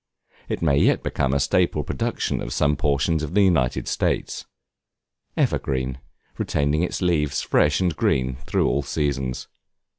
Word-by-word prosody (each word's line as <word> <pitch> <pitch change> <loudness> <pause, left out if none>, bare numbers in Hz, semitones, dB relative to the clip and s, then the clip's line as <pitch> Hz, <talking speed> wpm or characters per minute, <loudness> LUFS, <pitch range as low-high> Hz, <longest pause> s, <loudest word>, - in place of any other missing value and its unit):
It - - -3
may 70 -4 +3
yet - - +3
become 65 - -1
a 70 - +1
staple 75 +2 +1
production - - -2
of - - -4
some 75 +1 +2
portions 75 +3 +1
of 75 +4 -5
the 105 - +5
United 80 -10 +1
States. - - -2 0.9
Evergreen, 65 -1 -1 0.4
retaining 75 +2 0
its 90 +1 -2
leaves 75 -5 +1
fresh 75 -1 +2
and 90 -4 0
green 65 -3 0
through - - +1
all 70 - +1
seasons. 70 -2 -2
70 Hz, 145 wpm, -23 LUFS, 65-80 Hz, 0.9 s, the